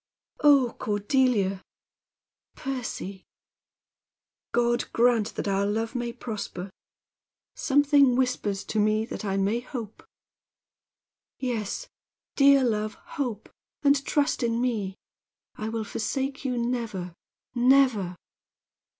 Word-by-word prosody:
"Oh, 280 -5 +5
Cordelia!" 205 -2 +1 0.9
"Percy!" 235 -7 -5 1.3
"God 240 0 +2
grant 235 -3 +2
that - - -3
our 200 0 +1
love 225 +2 -1
may 240 -2 -2
prosper! 210 -5 -6 0.8
Something 280 -2 +4
whispers 245 -6 0
to 220 - -2
me 215 +1 +2
that 225 - -6
I 195 -2 -1
may 200 +4 +1
hope." 240 -4 -7 1.4
"Yes, 230 -6 -3 0.5
dear 275 -1 +6
love, 215 -3 0 0.3
hope, 230 -6 -3 0.4
and 280 -1 +4
trust 290 0 +1
in 230 -1 +1
me. 215 -6 -1 0.6
I 215 -2 -4
will 225 0 -2
forsake 270 +7 -3
you 250 -2 -1
never, 230 -7 -2 0.4
never!" 245 -7 +3
235 Hz, 100 wpm, -27 LUFS, 210-260 Hz, 1.4 s, dear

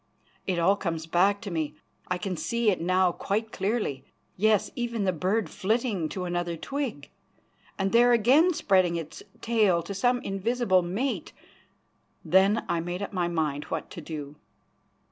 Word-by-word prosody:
It 185 -2 0
all 190 +4 +3
comes 165 -4 -3
back 190 +5 +2
to 205 -4 -6
me 155 -3 -2 0.3
I 180 - -1
can 185 0 -3
see 235 +4 +1
it 185 - -2
now 185 +1 +3
quite 215 +5 -2
clearly; 195 - -2 0.3
yes, 215 +1 +2
even 235 -3 -2
the 185 -1 +1
bird 190 +6 0
flitting 210 -5 -1
to 185 +2 -4
another 175 -1 -2
twig, 245 - -4 0.7
and 195 0 0
there 240 +1 +5
again 260 - +5
spreading 185 -7 +2
its 160 -2 -6 0.2
tail 210 -7 +2
to 200 - -6
some 245 +5 +2
invisible 195 0 +1
mate. 200 +11 -3 0.9
Then 190 +6 +3
I 170 - 0
made 175 +3 -4
up 200 - -6
my 180 -2 0
mind 155 -4 -1
what - - -5
to 170 - -7
do. 150 -2 -7
190 Hz, 160 wpm, -27 LUFS, 170-220 Hz, 0.9 s, there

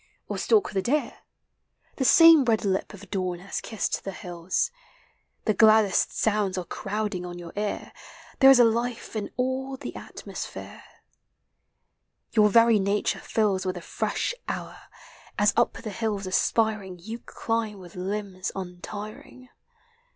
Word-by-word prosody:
Or - - -4
stalk 430 -3 +3
the 195 - 0
deer; 285 +9 -1 0.8
The 265 - 0
same 330 0 +8
red 225 -4 +1
li|> 190 -1 +2
of 205 -2 -13
dawn 185 -3 -1
lias 190 +3 -5
kissr.l 220 - -2
the 195 - -4
hills, 175 - -2 0.7
The 215 - +3
"laddesi 215 -1 +5
sounds 205 -3 0
are 180 - -3
crowding 205 0 -3
on 175 0 -7
your 170 -1 -9
ear, 210 0 -3 0.5
There 270 - +8
is 270 - +8
a - - +8
life 235 +1 -1
in 210 -2 -3
all 260 +1 -2
the - - -7
atmosphere: - - -8 1.5
Your 210 -2 +5
very 230 0 +5
nature 200 +1 0 0.2
(ills 205 -4 +2
With 185 0 -2
the 175 - -6
fresh 335 - -2
hour, - - -5 0.6
as 205 0 +4
up 235 - +3
the 220 - -7
hlllfl 205 -1 -2
aspirii 195 -1 0
You 220 +7 -7
climb 225 -3 -3
with 180 -3 -13
limbs 190 0 -4
untiring. 205 +7 -8
210 Hz, 145 wpm, -26 LUFS, 190-230 Hz, 1.5 s, same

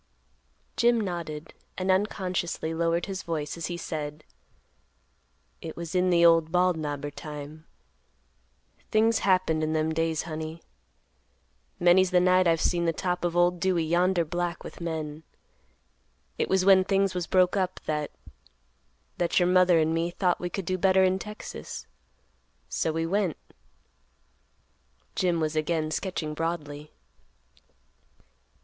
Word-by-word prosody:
Jim 235 0 +4
nodded, 170 -6 -5 0.2
and 185 0 +1
unconsciously 185 -4 -1
lowered 165 +1 0
his 190 -2 -5
voice, 155 -3 -3
as 165 -1 -4
he 175 - -4
said, 150 -2 -5 1.4
"It - - -7
was 170 -1 -6
in 180 0 +2
the 170 -1 +5
old 165 -1 +5
Bald 180 0 +3
Knobber 145 -2 -4
time. 150 +1 -9 1.2
Things 220 +1 +3
happened 185 -5 +2
in 155 0 0
them 155 0 0
days, 165 -1 0
honey. 160 0 -6 1.2
Many's 180 +1 +5
the 180 -1 +4
night 185 0 +4
I've 165 -1 +3
seen 170 +1 +1
the 165 - +1
top 180 +1 -2
of 175 0 -1
old 175 0 +3
Dewey 180 -1 +1
yonder 175 +2 +2
black 175 +1 -3
with - - -10
men. 160 -2 -4 1.2
It - - 0
was 190 -1 +2
when 190 -1 +7
things 195 0 +1
was 180 -2 -3
broke 185 0 +3
up, 185 -2 -1
that—that - - -5
your 175 0 +3
mother 180 -1 +5
and 160 0 +2
me 165 +1 0
thought 180 0 0
we 175 - -2
could 190 +1 -4
do 185 +2 -1
better 190 0 +4
in 185 0 +2
Texas; 210 - -8 0.8
so 160 - -1
we 165 +1 -1
went," 190 -2 0 1.8
Jim 175 -2 +1
was 155 0 -1
again 155 0 0
sketching 160 -4 -3
broadly. 150 -2 -4
170 Hz, 135 wpm, -27 LUFS, 155-185 Hz, 1.8 s, when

